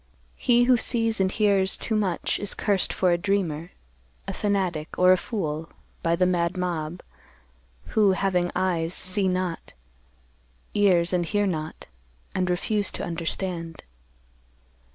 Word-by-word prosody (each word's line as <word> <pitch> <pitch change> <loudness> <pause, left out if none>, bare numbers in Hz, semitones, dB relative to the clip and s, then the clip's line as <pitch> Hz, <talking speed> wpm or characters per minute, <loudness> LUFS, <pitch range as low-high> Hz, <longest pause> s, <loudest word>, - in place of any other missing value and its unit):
He 245 -1 +4
who 250 0 +5
sees 225 -2 0
and 190 0 +2
hears 200 -3 +3
too 220 - -1
much 195 -5 0
is 205 - -2
cursed 200 -3 +1
for 185 -2 +2
a 175 - +2
dreamer, 175 -4 -1 0.6
a - - -3
fanatic, 185 -6 -1
or 180 0 +6
a - - +7
fool, 165 -6 -4 0.3
by 165 0 +2
the 180 +1 +2
mad 175 0 0
mob, 175 -2 -3 0.9
who, 205 -3 +4
having 185 -2 +1
eyes, 175 -2 0
see 190 +1 +1
not, 185 -2 -3 1.0
ears 185 -4 +3
and 180 -1 +2
hear 205 +4 0
not, 155 -4 -4 0.5
and 185 -1 0
refuse 205 +3 0
to - - -4
understand. 170 -1 -3
185 Hz, 135 wpm, -25 LUFS, 170-200 Hz, 1.0 s, a